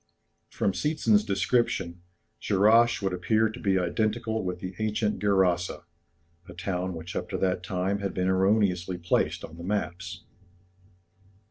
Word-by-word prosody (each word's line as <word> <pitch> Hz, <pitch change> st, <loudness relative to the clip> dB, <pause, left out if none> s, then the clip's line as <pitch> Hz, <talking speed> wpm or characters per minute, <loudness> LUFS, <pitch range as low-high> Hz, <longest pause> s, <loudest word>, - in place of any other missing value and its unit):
From 100 Hz, -, 0 dB
Seetzen's 110 Hz, -, +2 dB
description, 95 Hz, -4 st, 0 dB, 0.4 s
Dscherrasch 110 Hz, +3 st, +4 dB
would 95 Hz, -1 st, 0 dB
appear 110 Hz, +5 st, +2 dB
to 115 Hz, +3 st, -9 dB
be 100 Hz, -4 st, +1 dB
identical 110 Hz, +4 st, -1 dB
with 90 Hz, -1 st, -3 dB
the 90 Hz, +1 st, -6 dB
ancient 105 Hz, 0 st, 0 dB
Gerasa, 95 Hz, -4 st, +1 dB, 0.7 s
a -, -, -8 dB
town 90 Hz, 0 st, -3 dB
which 80 Hz, +2 st, -8 dB
up -, -, -3 dB
to -, -, -2 dB
that 90 Hz, -1 st, 0 dB
time 95 Hz, +3 st, -1 dB
had 100 Hz, -2 st, -3 dB
been 90 Hz, 0 st, 0 dB
erroneously 95 Hz, -2 st, +2 dB
placed 85 Hz, 0 st, 0 dB
on 80 Hz, -, -13 dB
the 85 Hz, -, -8 dB
maps. 90 Hz, -2 st, -3 dB
95 Hz, 140 wpm, -27 LUFS, 90-105 Hz, 0.7 s, Dscherrasch